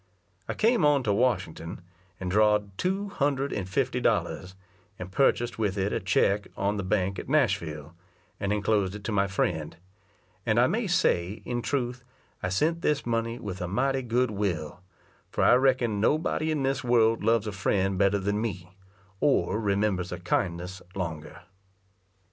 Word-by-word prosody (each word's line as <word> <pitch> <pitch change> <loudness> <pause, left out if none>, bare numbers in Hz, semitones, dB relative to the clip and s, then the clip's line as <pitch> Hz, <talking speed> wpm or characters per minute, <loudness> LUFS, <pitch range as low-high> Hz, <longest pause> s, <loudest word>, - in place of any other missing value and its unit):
I - - -2
came 230 -1 +3
on 145 -2 +4
to 105 -3 +1
Washington, 95 -8 -1 0.4
and 90 -1 -3
draw'd 105 -1 +2
two 195 - -1
hundred 140 -5 0
and 95 -3 -3
fifty 90 - 0
dollars, 95 0 0 0.4
and 90 +1 -7
purchased 120 -2 +1
with 105 -2 0
it 100 +1 0
a - - 0
check 100 +2 +1
on 100 +2 0
the 100 - -2
bank 95 0 0
at - - -8
Nashville, 75 -1 0 0.5
and 100 0 -1
enclosed 100 -2 +1
it 105 - -8
to 110 - -3
my 100 -1 +2
friend; 80 -5 -2 0.7
and 115 0 +2
I 120 - +6
may 215 - 0
say, 105 - +1
in 120 -1 -2
truth, 125 -2 -2 0.4
I 90 - -1
sent 160 - +1
this 150 -3 0
money 115 0 -1
with 95 -5 -6
a 90 - -2
mighty 130 +7 0
good 125 0 0
will, 90 -5 -3 0.5
for - - -1
I - - +6
reckon 125 -5 +2
nobody 155 +5 +1
in 155 -3 0
this 135 0 0
world 115 -3 +3
loves 115 0 +2
a 105 - -3
friend 95 0 0
better 100 0 +3
than 100 +2 -1
me, 95 -5 -5 0.5
or 140 -5 +2
remembers 100 -3 0
a 90 - -3
kindness 90 +1 -2
longer. 80 -5 -5
105 Hz, 165 wpm, -27 LUFS, 95-125 Hz, 0.7 s, I